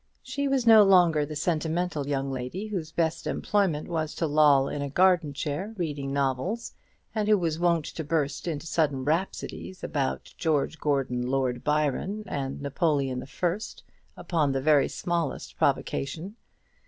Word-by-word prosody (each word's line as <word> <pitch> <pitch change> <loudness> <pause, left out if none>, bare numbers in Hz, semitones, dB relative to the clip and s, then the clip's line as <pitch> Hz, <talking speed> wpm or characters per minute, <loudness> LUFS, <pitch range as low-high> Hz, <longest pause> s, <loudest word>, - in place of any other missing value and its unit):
She 280 +2 -2
was 270 -3 +1
no 225 -2 +9
longer 175 -7 +5
the 155 - -6
sentimental 160 -1 -1
young 135 -1 -1
lady, 130 +10 -4
whose 180 -7 -4
best 160 -1 -1
employment 165 +1 0
was 160 -3 -2
to 165 - -1
loll 145 -3 +4
in 145 - -4
a 140 - -3
garden 175 0 +3
chair 150 +10 -4
reading 145 -6 -3
novels, 140 - -1 0.4
and 215 -2 -1
who 215 -1 +5
was 165 -3 -1
wont 170 -3 +2
to 160 - -5
burst 150 0 -1
into 160 -2 -3
sudden 145 -5 0
rhapsodies 180 +3 -3
about 140 -3 -2
George 160 -1 0
Gordon 130 -4 0
Lord 130 -2 -1
Byron 150 +8 0
and 140 -6 -4
Napoleon 140 -3 0
the 130 - -8
First 180 +9 -3 0.3
upon 155 -6 0
the 135 - -1
very 150 0 +4
smallest 170 -2 -3
provocation. 165 +9 -1
155 Hz, 155 wpm, -27 LUFS, 140-180 Hz, 0.4 s, no